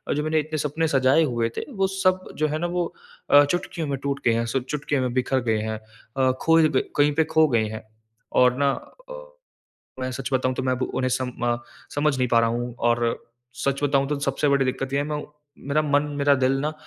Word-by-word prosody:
जो 150 - -1
मैनें 155 0 0
इतने 155 +1 -3
सपने 160 +3 -1
सजाए 135 +2 +3
हुए 120 -5 0
थे - - -2
वो 195 0 +2
सब 185 -1 0
जो 155 0 +2
है 155 +1 -2
ना 175 - -1
वो 175 0 -1 0.5
अ, 145 0 +8
चुटकियों 165 0 -3
में 140 -1 -2
टूट 140 0 -2
गए 115 - +4
हैं 115 +1 0
सब 125 +2 -1
चुटकियों 145 -2 -1
में 125 -1 -1
बिखर 130 +1 +1
गए 110 - +2
हैं। 110 0 -3 0.4
अ, 130 -1 +3
खोए 165 -1 +5
गए 130 - +2 0.2
कहीं 145 0 +4
पे 160 - +4
खो 160 -1 +5
गए 115 -3 +2
हैं। 110 0 -7 0.6
और 125 0 +5
ना 140 -1 +3 0.4
अ, - - -6 0.9
मैं 130 0 -2
सच 135 0 -5
बताऊँ 130 0 +1
तो 130 - -3
मैं 130 0 +1
अब 130 0 -2
उन्हें 130 0 0
सम 130 -1 -3 0.2
अ, - - -1 0.4
समझ 145 -1 +1
नहीं 125 -1 +1
पा 115 - +4
रहा 115 - +2
हूँ। 120 0 -3
और 120 0 0 0.4
सच 140 +1 0
बताऊँ 140 -1 +2
तो 150 -1 -1
सबसे 140 +1 0
बड़ी 140 -1 +3
दिक्कत 130 +1 -3
ये 140 - +1
है 145 - 0
मैं 150 0 -3 0.5
मेरा 150 +2 +2
मन, 145 -1 +2 0.2
मेरा 140 0 +4
दिल 130 0 +2
ना 150 +2 -1
140 Hz, 230 wpm, -24 LUFS, 130-150 Hz, 0.9 s, अ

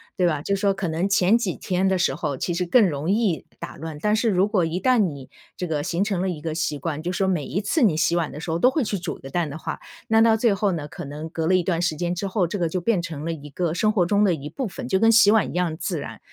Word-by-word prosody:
对 180 - +1
吧。 155 -4 +1
就 200 +6 0
说 195 0 +1
可 195 -2 -3
能 165 +4 -1
前 195 +2 +4
几 205 -7 -2
天 185 +1 -1
的 190 0 +2
时 175 -6 +1
候 150 -3 -3
其 175 - -2
实 180 +2 -1
更 210 +4 +5
容 150 +2 -3
易 205 -6 0
打 - - -7
乱， 160 0 -7
但 210 0 +2
是 225 +1 +1
如 190 -1 +3
果 200 -5 +1
一 165 +2 -2
旦 255 +4 +3
你 145 -10 -2 0.3
这 180 - -3
个 150 -3 -1
形 175 +3 0
成 200 -4 -1
了 190 - 0
一 165 -4 -5
个 160 0 -3
习 155 -2 -1
惯， 155 +1 -3
就 175 +2 -3
说 190 +1 0
每 175 -7 0
一 180 +11 -2
次 255 +10 0
你 205 -10 +4
洗 170 +2 +2
碗 170 -3 -1
的 150 - -8
时 160 - -6
候 165 - -1
都 250 - +5
会 275 +2 0
去 210 -2 -2
煮 170 - -4
个 135 - -11
蛋 165 +2 -1
的 145 - -6
话， - - -5 0.3
那 225 -1 +4
到 225 -1 +5
最 225 -1 +2
后 200 0 0
呢， 150 -3 -4
可 165 +2 -8
能 150 +3 -7
隔 160 -1 -2
了 185 - +4
一 185 - +2
段 170 -1 0
时 170 -3 0
间 175 +3 -2
之 195 +3 -3
后， 190 -1 +1
这 185 - -4
个 170 - +1
就 185 - -2
变 200 -1 +1
成 160 -4 -6
了 165 - -1
一 150 -2 -8
个 165 +3 -2
生 215 +5 +2
活 185 -5 +2
中 205 +3 +2
的 195 -4 +3
一 150 -2 -6
部 255 - -4
分， 245 +6 -7
就 190 - +1
跟 225 +2 +5
洗 215 -2 +6
碗 220 -1 +3
一 - - -7
样 180 -3 0
自 170 -1 -3
然。 115 -5 -8
180 Hz, 340 characters per minute, -23 LUFS, 160-200 Hz, 0.3 s, 洗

